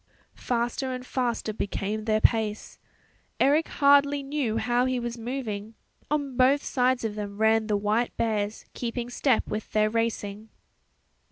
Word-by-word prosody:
Faster 245 +2 -2
and 255 0 -5
faster 240 -4 -2
became 210 +1 -3
their 215 -1 +2
pace. 220 -2 +1 0.6
Eric 300 +4 +3
hardly 285 0 +4
knew 275 -6 -1
how 240 +2 +1
he 255 -1 0
was 240 0 -4
moving; 225 -3 -5 0.3
on 285 -3 -1
both 270 +3 +4
sides 255 -2 +1
of 220 - -2
them 205 -1 -6
ran 220 0 +3
the 210 -2 +1
white 210 +4 0
bears 215 -2 -1
keeping 240 0 -4
step 255 -1 +1
with 215 0 -5
their 215 0 +3
racing. 220 -2 -2
230 Hz, 145 wpm, -26 LUFS, 215-255 Hz, 0.6 s, hardly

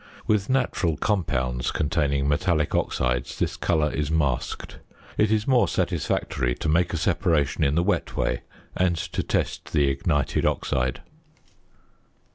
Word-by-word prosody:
With 105 -1 +1
natural 120 - +1
compounds 65 - 0
containing 70 -3 0
metallic 75 0 +1
oxides 60 -1 -1
this - - -1
colour 80 -3 +1
is 75 0 -1
masked. 75 -6 -1 0.4
It 105 - +3
is 110 -1 +2
more 130 -3 +4
satisfactory 60 -2 -1
to - - -4
make 85 +3 +2
a 85 - -1
separation 80 -3 +1
in 70 0 +2
the 85 - +3
wet 100 +3 -1
way - - 0 0.3
and 90 -2 +1
to - - -3
test - - -2
the 70 -2 +3
ignited 70 +1 0
oxide. 65 0 0
75 Hz, 135 wpm, -25 LUFS, 70-90 Hz, 0.4 s, more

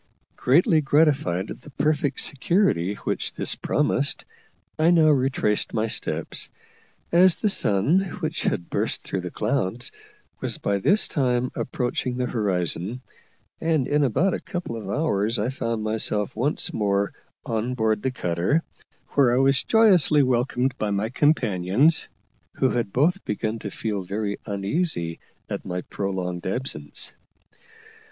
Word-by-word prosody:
Greatly 155 +4 +3
gratified 135 - +2
at - - -9
the - - -13
perfect 145 -1 0
security 145 - +1
which - - -2
this - - +2
promised, - - 0 0.5
I 160 +2 +4
now 165 -3 +5
retraced 130 -8 +1
my 110 0 +1
steps, 110 - -3 0.6
as 180 +1 +6
the 210 - 0
sun, 120 - +2 0.2
which 160 -1 -2
had 85 - -2
burst - - -1
through 95 - -3
the 90 - -5
clouds, 115 +2 -1 0.5
was - - -1
by 100 0 -1
this 200 - +3
time 125 -3 0
approaching 125 0 -2
the 125 - 0
horizon; 100 0 +1 0.6
and 160 -5 +1
in 150 0 +2
about 170 - +2
a - - -2
couple 175 -9 -5
of 110 - -7
hours 115 -7 0
I 105 +4 0
found 115 -4 -3
myself 110 -1 -1
once 135 +7 -1
more 100 -1 0 0.3
on 115 +2 -2
board 110 -3 +1
the 130 - 0
cutter, 90 - 0 0.5
where 125 -4 +3
I - - +2
was 135 0 +3
joyously 185 -10 +5
welcomed 125 +1 0
by 105 - -1
my 100 +2 -1
companions, 125 - +3 0.5
who 130 - +2
had 120 -5 -1
both 165 - +2
begun 110 +2 -2
to 105 - -5
feel 105 0 -3
very 100 +2 -3
uneasy 100 - -1 0.3
at - - -4
my 90 0 -4
prolonged 90 -2 -4
absence. 95 - -2
120 Hz, 140 wpm, -24 LUFS, 100-145 Hz, 0.6 s, as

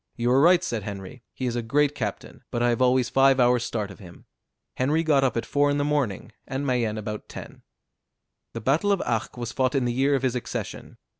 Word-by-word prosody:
"You 120 0 0
are 135 +2 +5
right," 175 +3 +5
said 115 -10 -2
Henry, 100 +4 -8
"he 130 - -5
is 120 -1 -1
a 120 - -1
great 145 +5 +1
captain, - - -5
but 120 0 -1
I 120 - +3
have 120 +1 0
always 125 -1 +3
five 135 +1 +4
hours' 125 -1 +4
start 105 -4 -3
of 100 - -13
him." 90 -4 -14 0.5
Henry 150 +6 +1
got 145 -4 +3
up 125 -3 +1
at 115 - -2
four 145 0 +2
in 145 - +1
the 145 - +1
morning, 140 -9 -1 0.2
and 135 +1 -3
Mayenne 120 -5 0
about 105 0 -6
ten. - - -10 0.9
The 115 - -5
battle 150 - +2
of 195 - +1
Arques 115 +1 -2
was 120 -1 -4
fought 130 +2 0
in 135 -2 +1
the 120 - 0
year 135 +3 +2
of 135 - -2
his 130 -2 +1
accession. 125 - -6
125 Hz, 230 wpm, -25 LUFS, 115-140 Hz, 0.9 s, are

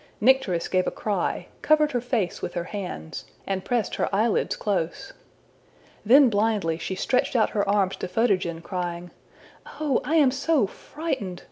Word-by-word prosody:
Nycteris 220 -8 +3
gave 185 -1 +1
a - - -4
cry, 210 -2 -1 0.2
covered 305 -1 +3
her 245 -3 -1
face 235 -7 -1
with - - -5
her 175 - -1
hands, 180 -4 -6 0.2
and 190 -1 -2
pressed 240 -5 -1
her - - 0
eyelids 215 +3 +1
close. 180 -6 -2 0.9
Then 265 +5 +7
blindly 205 -7 +1
she 190 - -3
stretched 250 +7 0
out 225 - +3
her 205 -2 0
arms 200 -2 +2
to - - -4
Photogen, 185 -5 0
crying, 175 -1 -4 0.5
``Oh, 295 -5 -1
I 315 - 0
am 290 -5 +5
so 275 -1 +2
frightened! 205 - -5
205 Hz, 155 wpm, -25 LUFS, 185-255 Hz, 0.9 s, Then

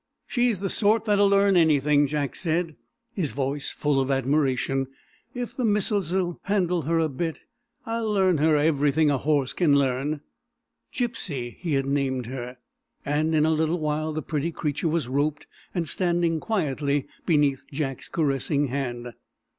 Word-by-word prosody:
"She's 240 -6 0
the 200 - 0
sort 220 +2 +3
that'll 205 -2 +4
learn 200 0 +4
anything," 150 -3 +4
Jack 145 -1 -2
said, 165 -2 -1 0.4
his 155 - -1
voice 140 +2 -2
full 145 -2 +1
of 135 - -2
admiration. 135 -1 +1 0.5
"If 245 -1 -5
the 255 - -2
missus'll 190 -5 +1
handle 180 -4 +1
her 165 +3 0
a 165 -1 +2
bit, 160 +3 -4 0.4
I'll 225 -1 -2
learn 190 -5 +3
her 155 +1 +4
everything 150 0 +2
a 140 - +1
horse 145 -2 +1
can 155 -6 +3
learn." 140 +2 0 0.7
"Gypsy" 170 - -3
he 165 -4 -3
had 135 -1 +1
named 135 -3 -1
her, 125 0 -6 0.5
and 155 +2 +1
in 155 0 +4
a 160 - +3
little 160 +2 +1
while 155 0 -1
the 155 0 -4
pretty 155 +1 -2
creature 150 0 -2
was 160 -5 -1
"roped" 145 +3 -1 0.3
and 170 -3 -1
standing 170 -2 0
quietly 145 - -1 0.2
beneath 145 -5 +2
Jack's 135 -3 -4
caressing 145 -2 0
hand. 120 -3 -4
155 Hz, 155 wpm, -25 LUFS, 140-175 Hz, 0.7 s, that'll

